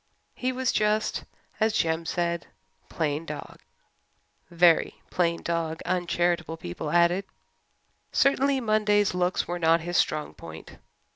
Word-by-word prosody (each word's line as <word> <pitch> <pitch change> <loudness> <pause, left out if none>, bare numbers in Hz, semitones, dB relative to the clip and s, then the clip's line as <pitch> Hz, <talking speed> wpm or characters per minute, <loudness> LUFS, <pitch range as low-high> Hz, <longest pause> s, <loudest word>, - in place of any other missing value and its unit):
He 255 0 -2
was 255 -1 0
just, 215 0 0 0.3
as 220 0 +2
Jem 165 0 0
said, 170 0 -1 0.4
"plain 150 -1 -1
dog" 165 - -8 0.9
very 170 -1 +3
plain 170 -2 0
dog, 165 -1 -2
uncharitable 175 -2 0
people 120 - -5
added. 175 +3 +3 0.9
Certainly, 275 0 +3
Monday's 210 -3 +2
looks 180 0 0
were 175 0 -3
not 165 0 +4
his 175 +1 -2
strong 155 -1 0
point. - - -11
175 Hz, 120 wpm, -26 LUFS, 165-210 Hz, 0.9 s, not